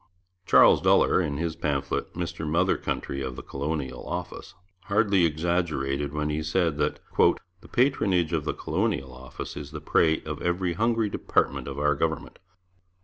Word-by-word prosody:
Charles - - +6
Duller, - - +4
in 75 -5 -2
his 80 0 -2
pamphlet 70 -2 -2
Mr 85 -3 -4
Mother 80 - +2
Country 70 - -3
of 65 -2 -4
the - - -8
Colonial 70 -1 -4
Office, - - -6 0.3
hardly 100 -3 +3
exaggerated 75 -4 -1
when 75 0 -2
he 75 +1 -1
said 80 -1 0
that 75 - 0 0.2
'the 90 +1 +1
patronage 95 - +2
of 80 -3 0
the 75 - -2
Colonial 65 -2 -2
Office 65 +1 -8
is 70 -2 -7
the 75 0 -7
prey 80 +1 +2
of 75 -1 -6
every 90 0 0
hungry 115 +2 +1
department - - 0
of 70 0 -6
our 75 0 +2
government. 80 +2 -3
80 Hz, 155 wpm, -26 LUFS, 75-90 Hz, 0.3 s, Charles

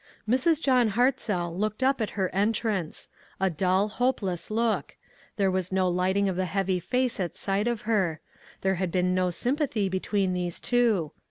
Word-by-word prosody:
Mrs. 260 +7 +3
John 250 -8 +3
Hartzell 205 -8 +1
looked 215 +5 -2
up 265 -1 +2
at 215 - -3
her 190 -2 +1
en 205 +4 +2
trance; 205 -8 -2 0.3
a 190 -1 +2
dull, 185 +5 +2
hopeless 210 -6 -1
look; 225 0 -1 0.4
there 195 -2 +2
was 185 -1 -1
no 190 -1 +2
lighting 185 +3 +1
of 190 - -1
the 185 +1 0
heavy 190 0 0
face 250 +6 -1
at 175 -3 -2
sight 200 +3 -1
of 235 -2 -1
her; 190 -8 0 0.4
there 190 0 +1
had 185 -2 -1
been 180 0 +1
no 185 0 +1
sympathy 245 - -1
between 190 0 0
these 180 -1 -3
two. 225 -10 +1
195 Hz, 175 wpm, -27 LUFS, 185-230 Hz, 0.4 s, Mrs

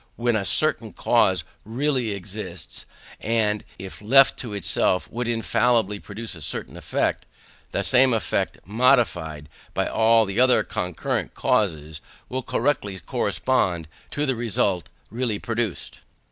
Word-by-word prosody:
When 120 -1 0
a 105 - 0
certain - - +3
cause 95 -3 +2 0.2
really 130 +1 -1
exists, 95 -3 -6 0.3
and 110 -2 0
if 95 +2 -9
left 135 +6 +5
to 120 - -4
itself 95 -2 0
would 120 +1 -3
infallibly 115 -2 +1
produce 110 +3 -7
a 80 - -9
certain - - -2
effect, - - -2 0.4
that - - 0
same 130 0 +5
effect, 115 -2 -1
modified 105 - +1 0.3
by - - +1
all 115 0 +3
the 100 +3 -3
other 130 0 +5
concurrent 90 -2 -3
causes, 80 -7 0 0.3
will 130 +1 -2
correctly 105 -6 -1
correspond 90 - 0 0.2
to 145 - -2
the 130 -3 0
result 100 -6 0 0.2
really 115 -2 -1
produced. 115 -4 -3
110 Hz, 130 wpm, -24 LUFS, 95-120 Hz, 0.4 s, left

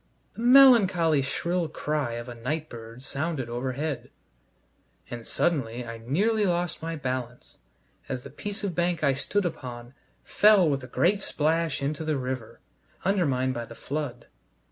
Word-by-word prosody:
The - - -8
melancholy 215 - +6
shrill 170 +6 -1
cry 150 -5 -2
of 120 +1 -5
a 120 - -6
night 150 +7 -3
bird 115 +2 -10
sounded 140 -3 -3
overhead, 130 +4 -3 1.0
and 120 -1 -7
suddenly 125 -8 0
I 115 -1 -7
nearly 205 - +1
lost 175 -1 -1
my 165 +1 -3
balance 130 -4 -5 0.5
as 130 -2 -3
the - - -10
piece 205 0 -5
of 195 -3 -1
bank 175 -1 0
I 140 -2 +4
stood 200 +9 -1
upon 125 -6 -6 0.3
fell 205 -4 +5
with 140 -3 0
a - - -7
great 195 +8 +2
splash 160 -3 0
into 150 +3 -2
the 155 -2 0
river, 130 -3 -5 0.4
undermined 140 -10 +1
by 120 -1 -4
the 115 - -11
flood. 140 -4 -4
145 Hz, 150 wpm, -27 LUFS, 125-175 Hz, 1.0 s, melancholy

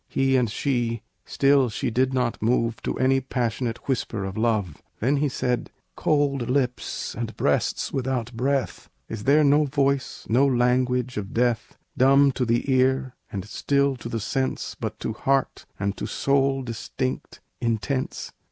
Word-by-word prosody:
He 135 0 +2
and 125 -3 +2
she; 115 -2 -1 0.2
still 135 -2 +3
she 110 - -2
did 130 +3 +2
not 125 -3 -1
move 115 0 +1
To - - -3
any 135 +1 +3
passionate 120 -2 -2
whisper 115 -6 -1
of 95 0 -5
love. 110 -8 0 0.2
Then 135 +6 +2
he 145 +1 +1
said, 125 -1 -1 0.3
"Cold 140 -5 +1
lips 125 -2 -1
and 115 -1 -5
breasts - - 0
without 125 -3 -2
breath, 135 +3 -1 0.2
Is 110 -1 -6
there 150 +3 +5
no 145 +1 +4
voice, 140 -1 0
no 130 +5 +4
language 125 -1 +1
of 100 -2 -5
death, 120 -1 0 0.2
"Dumb 135 +2 +5
to 130 -1 -1
the 120 +3 +1
ear 130 0 +2 0.2
and 100 -1 -4
still 140 +5 +1
to 115 0 -7
the 115 - -2
sense, 130 +5 -2
But - - -5
to - - -2
heart 135 -1 0
and 100 0 -1
to - - -4
soul 135 -1 +1
distinct, 125 +2 -4 0.2
intense? 120 +3 -2
125 Hz, 155 wpm, -25 LUFS, 115-135 Hz, 0.3 s, there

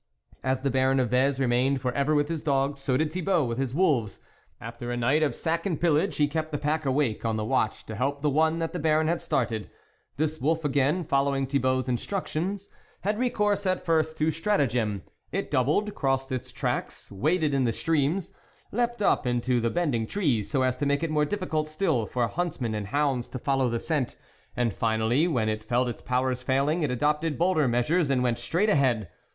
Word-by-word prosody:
As 130 0 0
the 135 0 0
Baron 130 +1 +2
of 125 -3 0
Vez 135 +2 +2
remained 130 +1 +2
for 125 -1 -1
ever 140 +4 +1
with 145 0 +2
his 165 -1 -3
dogs, 140 -1 0
so 135 -2 0
did 155 +1 -1
Thibault 180 -2 +1
with 120 +1 -3
his 135 -1 -2
wolves; 145 - +1 0.4
after 115 +1 -6
a 120 - -2
night 130 +6 +2
of 155 - +1
sack 165 +4 -1
and 170 -6 -2
pillage, 170 +3 +2
he 150 - +3
kept 155 +1 -3
the 145 - -1
pack 150 0 -1
awake 130 -5 0
on 115 -1 0
the 110 -1 -2
watch 110 0 0
to 110 - -7
help 140 +6 -2
the 150 - +3
one 160 +3 +2
that 165 -1 -3
the 180 - -3
Baron 155 0 +2
had 170 +1 0
started. 115 -5 -1 0.5
This 155 0 -1
wolf 160 +3 0
again, 145 +5 +1
following 140 -2 +1
Thibault's 130 -1 0
in 125 -1 +1
structions, 195 - -3 0.3
had 210 +3 -1
recourse 210 -5 +1
at 185 0 -1
first 160 -2 +1
to 155 +1 +2
strata 165 -1 +1
gem. 110 -6 -1 0.3
It - - -3
doubled, 155 - +1
crossed 135 -1 -1
its 130 -1 -4
tracks, - - -3
waded 150 - +1
in 135 -2 +2
the 115 - +2
streams, 160 - 0 0.4
leaped 240 -1 -1
up 130 - +2
into 120 0 +1
the 115 - +1
bending 135 -8 0
trees 135 - 0
so 135 -3 +1
as 130 -1 +1
to 145 - -1
make 140 +2 +1
it 165 - -1
more 150 -1 +2
diffi 205 0 -3
cult 155 -1 -1
still 155 - 0
for 120 -2 0
huntsmen 155 -10 -2
and 105 -2 -3
hounds 135 0 0
to - - -5
fol 135 +2 0
low 130 -2 +2
the 115 0 -1
scent, 145 -5 -1 0.4
and 120 -4 +1
finally 115 - +1
when 125 -10 0
it 110 0 -2
felt 120 +3 +1
its 120 - -5
powers 125 0 0
failing, 140 +6 +1
it 150 - +1
adopted 150 +4 0
bolder 170 -4 +2
measures 140 +7 +1
and 130 -2 +2
went 120 -2 0
straight 185 +6 0
ahead. 130 - +2
140 Hz, 215 wpm, -27 LUFS, 125-160 Hz, 0.5 s, he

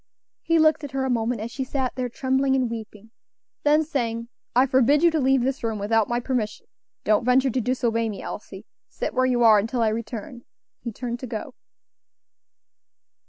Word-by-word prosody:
He 330 - +2
looked 310 -1 +4
at 280 -2 -7
her 265 -1 -1
a 260 - 0
moment 230 -1 -1
as 230 +2 -5
she 265 - -3
sat 260 -1 -2
there 250 -1 -3
trembling 265 +2 +1
and 255 -3 0
weeping; 220 -1 -8 0.5
then 300 +1 +4
saying, 235 -6 -3 0.3
"I 255 +2 +6
forbid 270 +3 +3
you 340 - +6
to 320 - 0
leave 265 -2 +3
this 265 0 -2
room 225 -2 -1
without 215 +1 +1
my 240 0 0
permission; 245 -4 -3 0.4
don't 215 +1 +2
venture 255 +2 +3
to 255 - 0
disobey 230 -2 0
me, 205 - -6
Elsie; - - -8 0.2
sit - - -4
where 255 0 +2
you 245 -2 +2
are 220 -2 +7
until 230 +3 -1
I 220 - +3
return," 230 +2 -5 0.4
he 235 - -5
turned 240 +2 -5
to 255 - -6
go. 230 +3 -6
245 Hz, 190 wpm, -24 LUFS, 225-265 Hz, 0.5 s, are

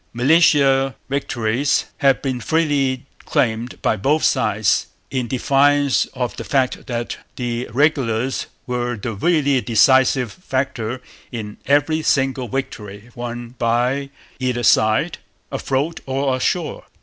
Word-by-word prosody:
Militia 135 0 +4
victories 130 -1 0
have 135 -2 +2
been 130 -3 -2
freely 140 -1 0 0.2
claimed 115 +1 -1
by - - +2
both 145 +10 +1
sides, - - +2 0.2
in 130 -3 -1
defiance 140 +2 +2
of 125 -1 -2
the - - -5
fact 130 -3 -1
that 120 -2 -3 0.2
the 120 -1 -3
regulars 130 -2 +1 0.2
were 120 -1 -2
the 110 +3 -4
really 140 - +2
decisive 125 +1 +3
factor 130 - -3 0.3
in 110 -4 -6
every 145 +3 +2
single 135 -4 +1
victory 110 -4 -6
won 120 0 -6
by 125 +4 +1 0.3
either 125 -2 -1
side, 110 - +3 0.3
afloat 145 +5 -1
or 135 0 0
ashore. 160 +5 -2
130 Hz, 115 wpm, -20 LUFS, 120-140 Hz, 0.3 s, Militia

